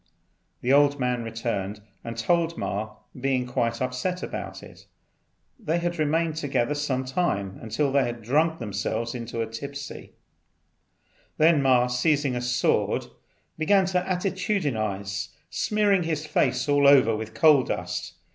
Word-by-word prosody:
The 125 Hz, +2 st, +2 dB
old 145 Hz, 0 st, +4 dB
man 125 Hz, -1 st, 0 dB
returned 115 Hz, -3 st, -3 dB, 0.2 s
and 115 Hz, 0 st, -6 dB
told 170 Hz, +8 st, +1 dB
Ma, 105 Hz, +2 st, -3 dB, 0.2 s
being 130 Hz, -1 st, 0 dB
quite 115 Hz, -1 st, -1 dB
upset 130 Hz, +9 st, -2 dB
about -, -, -6 dB
it. -, -, -14 dB, 0.7 s
They 170 Hz, -7 st, 0 dB
remained 160 Hz, -1 st, 0 dB
together 140 Hz, -3 st, 0 dB
some 140 Hz, -3 st, -1 dB
time 115 Hz, -, -1 dB
until 115 Hz, +6 st, -1 dB
they 140 Hz, 0 st, +3 dB
had 120 Hz, -1 st, -4 dB
drunk 155 Hz, +7 st, +2 dB
themselves 110 Hz, +1 st, -3 dB
tipsy. 120 Hz, +4 st, -6 dB, 1.2 s
Then 155 Hz, -1 st, +5 dB
Ma, 130 Hz, -2 st, +4 dB
seizing 135 Hz, +2 st, +1 dB
a 125 Hz, -, -2 dB
sword, 125 Hz, 0 st, +1 dB, 0.5 s
began 190 Hz, +4 st, +4 dB
to 185 Hz, 0 st, +1 dB
attitudinize, 140 Hz, -, -2 dB, 0.2 s
smearing 205 Hz, -3 st, +2 dB
his 160 Hz, -2 st, -2 dB
face 150 Hz, -, +1 dB
all 145 Hz, -1 st, +4 dB
over 130 Hz, -5 st, +6 dB
with 110 Hz, 0 st, -6 dB
coal 150 Hz, -4 st, +6 dB
dust. -, -, -4 dB
130 Hz, 130 wpm, -26 LUFS, 115-155 Hz, 1.2 s, over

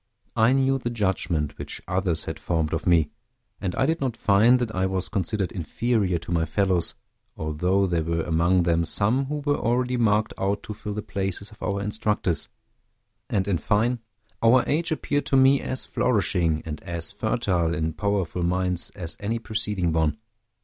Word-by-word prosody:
I 110 Hz, +3 st, +4 dB
knew 135 Hz, 0 st, +2 dB
the 120 Hz, -, -3 dB
judgment 95 Hz, -9 st, -1 dB
which -, -, -6 dB
others 90 Hz, -2 st, +1 dB
had 80 Hz, -, -5 dB
formed 80 Hz, -3 st, -1 dB
of 80 Hz, -, -2 dB
me; 85 Hz, -3 st, +4 dB, 0.5 s
and 90 Hz, -3 st, -3 dB
I 135 Hz, -, +2 dB
did 160 Hz, +2 st, 0 dB
not 130 Hz, -4 st, -1 dB
find 110 Hz, +5 st, +5 dB
that 120 Hz, -3 st, -2 dB
I 95 Hz, +1 st, +1 dB
was 95 Hz, -1 st, -2 dB
considered 100 Hz, -1 st, -1 dB
inferior 100 Hz, +1 st, 0 dB
to 85 Hz, +1 st, -8 dB
my 85 Hz, -1 st, +2 dB
fellows, 90 Hz, +1 st, 0 dB, 0.4 s
although 90 Hz, +6 st, +1 dB
there 85 Hz, -3 st, 0 dB
were 85 Hz, 0 st, -1 dB
among 85 Hz, +2 st, +2 dB
them 85 Hz, -1 st, +2 dB
some 110 Hz, -, +2 dB
who 145 Hz, +1 st, -4 dB
were 145 Hz, -1 st, +1 dB
already 125 Hz, +2 st, +1 dB
marked 110 Hz, -2 st, +2 dB
out 100 Hz, +1 st, 0 dB
to 105 Hz, -, -6 dB
fill 105 Hz, 0 st, -6 dB
the 105 Hz, -, -3 dB
places 100 Hz, -1 st, -3 dB
of 105 Hz, -, -17 dB
our 100 Hz, 0 st, -1 dB
instructors. 105 Hz, -6 st, -1 dB, 0.8 s
And, 95 Hz, -1 st, 0 dB
in 90 Hz, -5 st, +1 dB
fine, 115 Hz, +4 st, +1 dB, 0.4 s
our 120 Hz, +2 st, +5 dB
age 160 Hz, +3 st, 0 dB
appeared 145 Hz, -2 st, -1 dB
to 135 Hz, -, +3 dB
me 135 Hz, +1 st, +5 dB
as 130 Hz, -, -2 dB
flourishing, 90 Hz, -9 st, +1 dB
and 75 Hz, -1 st, -5 dB
as 85 Hz, 0 st, -5 dB
fertile 100 Hz, -5 st, 0 dB
in 80 Hz, +1 st, -1 dB
powerful 95 Hz, 0 st, -1 dB
minds 90 Hz, 0 st, 0 dB
as 85 Hz, -4 st, -5 dB
any 110 Hz, +3 st, -1 dB
preceding 105 Hz, -6 st, 0 dB
one. 80 Hz, +1 st, +1 dB
100 Hz, 175 wpm, -25 LUFS, 85-115 Hz, 0.8 s, find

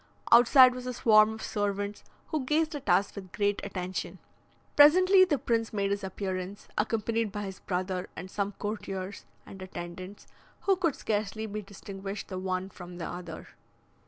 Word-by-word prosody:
Outside 250 Hz, +2 st, +8 dB
was 250 Hz, 0 st, -7 dB
a 250 Hz, -, -3 dB
swarm 215 Hz, -2 st, +5 dB
of 220 Hz, 0 st, -7 dB
servants, 205 Hz, 0 st, -2 dB, 0.3 s
who 310 Hz, -4 st, -1 dB
gazed 310 Hz, +4 st, +1 dB
at 285 Hz, -8 st, -6 dB
us 185 Hz, +3 st, +3 dB
with 190 Hz, -3 st, -9 dB
great 205 Hz, -1 st, 0 dB
attention. 185 Hz, -2 st, -4 dB, 0.6 s
Presently 370 Hz, +6 st, +7 dB
the 310 Hz, -6 st, +1 dB
prince 230 Hz, -2 st, 0 dB
made 200 Hz, -2 st, -1 dB
his 200 Hz, 0 st, -1 dB
appearance, 190 Hz, 0 st, -5 dB
accompanied 225 Hz, 0 st, 0 dB
by 205 Hz, 0 st, -4 dB
his 190 Hz, -2 st, -7 dB
brother, 185 Hz, 0 st, -3 dB
and 185 Hz, +1 st, -8 dB
some 205 Hz, 0 st, -2 dB
courtiers 200 Hz, -2 st, -5 dB, 0.2 s
and 195 Hz, -, -11 dB
attendants, 185 Hz, +1 st, -8 dB, 0.4 s
who 390 Hz, -, +3 dB
could 335 Hz, -6 st, 0 dB
scarcely 215 Hz, 0 st, -2 dB
be 215 Hz, 0 st, -5 dB
distinguished 195 Hz, 0 st, -7 dB
the 185 Hz, -2 st, -4 dB
one 185 Hz, 0 st, -2 dB
from 175 Hz, -1 st, -10 dB
the 170 Hz, -, -5 dB
other. 175 Hz, -2 st, -7 dB
205 Hz, 160 wpm, -29 LUFS, 190-230 Hz, 0.6 s, Outside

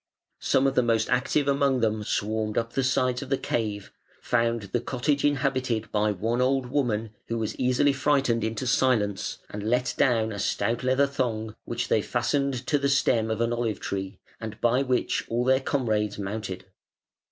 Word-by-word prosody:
Some 135 Hz, -, +2 dB
of 135 Hz, -, +2 dB
the 125 Hz, -, +4 dB
most 115 Hz, -2 st, +1 dB
active 135 Hz, +3 st, +1 dB
among 140 Hz, -2 st, +2 dB
them 110 Hz, -1 st, 0 dB
swarmed 105 Hz, +1 st, -1 dB
up 115 Hz, 0 st, -1 dB
the 135 Hz, -, 0 dB
sides 130 Hz, -1 st, +1 dB
of 140 Hz, -, -7 dB
the 135 Hz, -, +2 dB
cave, 105 Hz, -6 st, -3 dB, 0.3 s
found 115 Hz, -2 st, 0 dB
the 120 Hz, -, +1 dB
cottage 140 Hz, +4 st, -1 dB
inhabited 130 Hz, -5 st, 0 dB
by 105 Hz, 0 st, +2 dB
one 115 Hz, +5 st, -1 dB
old 130 Hz, 0 st, +2 dB
woman 115 Hz, -6 st, 0 dB, 0.2 s
who 115 Hz, -, -2 dB
was 110 Hz, -1 st, -2 dB
easily 130 Hz, +3 st, +2 dB
frightened 135 Hz, -4 st, +1 dB
into 110 Hz, +3 st, -2 dB
silence, 115 Hz, -6 st, +1 dB
and 105 Hz, -, -5 dB
let 125 Hz, +4 st, 0 dB
down 115 Hz, -4 st, +3 dB
a 100 Hz, -, -5 dB
stout 115 Hz, +5 st, -1 dB
leather 130 Hz, +2 st, +3 dB
thong 115 Hz, -6 st, -2 dB
which 120 Hz, +1 st, -3 dB
they 110 Hz, -, +2 dB
fastened 130 Hz, +2 st, -1 dB
to 145 Hz, +3 st, +1 dB
the 140 Hz, 0 st, +1 dB
stem 120 Hz, -5 st, +2 dB
of 110 Hz, 0 st, -1 dB
an 115 Hz, 0 st, +1 dB
olive 115 Hz, -3 st, -1 dB
tree, 95 Hz, 0 st, -4 dB, 0.2 s
and 110 Hz, -2 st, -7 dB
by 120 Hz, +2 st, +2 dB
which 130 Hz, -2 st, 0 dB
all 120 Hz, +1 st, 0 dB
their 130 Hz, 0 st, +4 dB
comrades 110 Hz, -7 st, 0 dB
mounted. 100 Hz, -2 st, -5 dB
120 Hz, 180 wpm, -26 LUFS, 110-130 Hz, 0.3 s, the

